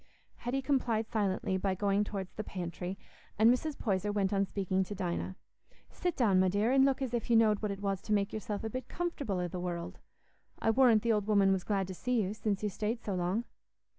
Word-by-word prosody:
Hetty 260 +3 -2
complied 240 -5 +1
silently 195 -3 0
by 190 0 0
going 200 +1 +2
towards 195 -3 -5
the 215 - -4
pantry, 180 0 -5 0.4
and 225 +3 +6
Mrs. 295 +3 -3
Poyser 205 -2 0
went 200 -1 0
on 195 0 +2
speaking 190 -1 0
to 205 - -6
Dinah. 185 0 -3 0.6
"Sit 355 -2 -2
down, 205 -7 +3
my 185 - +4
dear, 205 +6 +2
an' 270 0 +5
look 275 0 +1
as 250 -2 -3
if 240 -1 -2
you 235 - +5
knowed 215 -2 +4
what 210 - -1
it 200 0 -5
was 195 -2 -1
to - - -7
make 200 -1 +1
yourself 210 -1 -4
a 220 - -2
bit 255 +1 -5
comfortable 310 - -3
i' 180 - -1
the 180 +1 -5
world. 175 -1 -4 0.6
I 225 - +2
warrant 235 -3 +5
the 230 -1 +3
old 210 -1 0
woman 200 -2 +4
was 190 -2 +1
glad 195 -2 0
to 190 - -5
see 250 +6 0
you, 195 +2 -2
since 215 -2 -2
you 210 - +1
stayed 215 +4 -3
so 200 - -2
long." 180 +5 0
205 Hz, 225 wpm, -32 LUFS, 190-230 Hz, 0.6 s, and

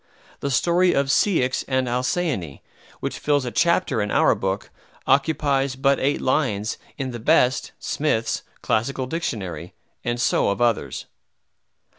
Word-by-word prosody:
The 140 - -2
story 175 +7 +3
of 140 0 +1
Ceyx 135 -8 +2
and 130 -1 0
Halcyone, 125 - -1 0.4
which - - -3
fills 145 -3 +1
a 120 - -3
chapter 170 - +2
in 105 - -1
our - - +4
book, - - -3 0.3
occupies 140 -1 +2
but 135 +1 +2
eight 140 +2 +1
lines 115 -6 0 0.2
in 135 -2 -3
the 120 - -6
best 130 0 +2
(Smith's) - - -1 0.2
Classical 130 +4 0
Dictionary; 95 - -4 0.3
and 120 0 -2
so 120 - +2
of 100 - -1
others. 115 - 0
130 Hz, 135 wpm, -23 LUFS, 120-145 Hz, 0.4 s, our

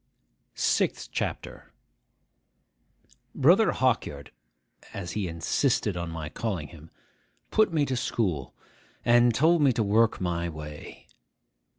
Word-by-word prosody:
SIXTH - - 0
CHAPTER - - -5 1.6
BROTHER - - +4
HAWKYARD 70 0 -1 0.6
(as 90 -4 -5
he 105 -3 -2
insisted 95 - 0
on 85 -1 -4
my 80 -2 -5
calling 90 -4 -4
him) 80 -1 -14 0.6
put 215 -3 +3
me 155 -3 +1
to 130 - -2
school, 90 - -2 0.5
and 120 0 +5
told 165 +5 +4
me 140 -2 +5
to 115 -2 0
work 110 +3 +2
my 85 -1 -2
way. 75 -1 -10
100 Hz, 110 wpm, -27 LUFS, 80-120 Hz, 1.6 s, and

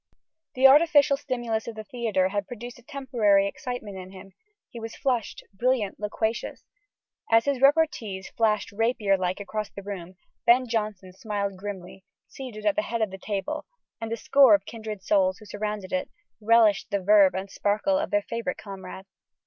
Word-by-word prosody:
The 260 +1 +3
artificial 290 0 +6
stimulus 240 -5 -3
of 230 - -6
the 215 - -7
theatre 220 -7 0
had 200 0 -2
produced 245 +1 -8
a - - -17
temporary 240 -8 +1
excitement 220 -2 -5
in 185 0 -9
him 195 0 -13 0.3
he 235 - -10
was 225 0 -7
flushed, 250 -6 -2
brilliant, 230 -1 0
loquacious. 220 +2 -3 0.7
As 225 0 +4
his 280 -2 0
repartees 275 -10 +2
flashed 220 -2 0
rapier 215 -2 +1
like 185 0 -2
across 210 +1 -4
the 200 - -10
room, 190 -3 -7 0.3
Ben 245 +2 +4
Jonson 210 -5 -3
smiled 200 -1 -3
grimly, 190 -1 -8 0.2
seated 245 -6 -9
at 310 - +3
the 315 - +2
head 230 -8 -2
of 210 - -2
the 190 - -8
table, 195 -2 -4 0.3
and 225 0 -4
a 230 - -1
score 265 -1 +6
of 200 -1 -3
kindred 215 -4 -7
souls, 190 -2 +2
who 215 - -15
surrounded 205 0 -5
it, 275 0 -1 0.3
relished 220 -2 +4
the 200 - 0
verve 200 -1 +5
and 190 +1 -4
sparkle 215 +8 +1
of 310 - -2
their 205 0 +1
favourite 230 -5 -4
comrade. 190 -1 -9
215 Hz, 175 wpm, -26 LUFS, 195-245 Hz, 0.7 s, artificial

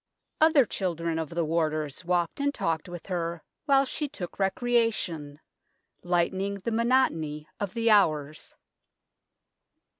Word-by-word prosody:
Other 315 -4 +6
children 170 -5 -2
of 160 -3 -3
the 170 -1 -1
warders 155 -1 -1
walked 175 +2 0
and 285 0 +1
talked 165 - -2
with 175 -1 -8
her 170 -3 -3 0.2
while 275 -2 +4
she 290 +2 -3
took 175 -7 -7
recreation, 195 - 0 0.6
lightening 185 +3 0
the 200 +4 -4
monotony 220 - +1
of 205 0 -4
the 230 -1 +2
hours. 155 -7 +2
175 Hz, 120 wpm, -27 LUFS, 160-230 Hz, 0.6 s, Other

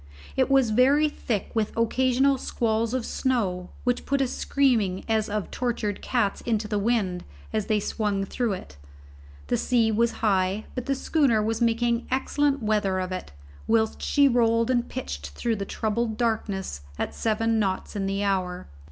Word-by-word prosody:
It - - +2
was 270 -4 +4
very 275 +7 +4
thick 225 -8 -3
with 220 -1 -1
occasional 260 +3 +2
squalls 230 0 0
of 250 -3 -1
snow, 195 -9 -1
which 245 -1 0
put 280 0 +1
a 270 - +2
screaming 235 -9 +1
as 220 -1 +1
of 210 -1 -3
tortured 230 -5 -2
cats 220 -6 0
into 220 -2 -1
the 210 -1 -1
wind 200 -5 0 0.3
as 215 -2 -1
they 215 -1 +2
swung 205 -1 -1
through 230 +1 -1
it. 130 - -9 0.7
The - - 0
sea 230 -3 +2
was 230 +2 +2
high, 195 0 +1
but 250 -2 -5
the 275 - +1
schooner 265 -6 +2
was 225 +2 -1
making 235 0 +1
excellent 275 +1 +1
weather 210 -3 +1
of 185 0 -3
it, 185 - -5 0.4
whilst 220 -1 +1
she 285 -1 +4
rolled 230 -1 +3
and 240 -1 0
pitched 70 +1 -5
through 230 -2 -1
the 200 - -3
troubled 220 +2 -2
darkness 205 - -2 0.2
at - - -3
seven 225 0 +1
knots 195 0 -2
in 195 -1 -1
the 195 +1 -1
hour. 185 -2 -1
225 Hz, 170 wpm, -26 LUFS, 200-245 Hz, 0.7 s, was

